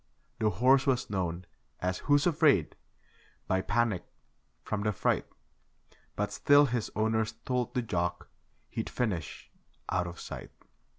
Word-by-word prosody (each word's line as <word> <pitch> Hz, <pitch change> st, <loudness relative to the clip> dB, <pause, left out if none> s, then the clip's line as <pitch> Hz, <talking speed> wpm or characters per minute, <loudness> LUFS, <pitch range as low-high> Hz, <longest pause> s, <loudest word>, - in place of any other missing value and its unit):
The 110 Hz, -, +3 dB
horse 130 Hz, +8 st, +4 dB
was 125 Hz, -5 st, +1 dB
known 90 Hz, -2 st, -2 dB, 0.3 s
as 90 Hz, 0 st, -1 dB
'Who's 145 Hz, 0 st, +3 dB
Afraid', 150 Hz, -, +3 dB, 0.7 s
by 95 Hz, 0 st, +1 dB
Panic 105 Hz, -2 st, +1 dB, 0.6 s
from 105 Hz, -1 st, -2 dB
'The 105 Hz, 0 st, 0 dB
Fright'. -, -, 0 dB, 0.9 s
But 105 Hz, 0 st, -1 dB
still 145 Hz, +6 st, +6 dB
his 120 Hz, -4 st, -1 dB
owners 110 Hz, 0 st, +1 dB
told 125 Hz, 0 st, -1 dB
the 125 Hz, -, +1 dB
jock 85 Hz, -5 st, -2 dB, 0.4 s
he'd -, -, -3 dB
finish 100 Hz, -, -3 dB, 0.4 s
out 90 Hz, -1 st, +1 dB
of 85 Hz, 0 st, -8 dB
sight. -, -, -7 dB
110 Hz, 130 wpm, -30 LUFS, 90-125 Hz, 0.9 s, still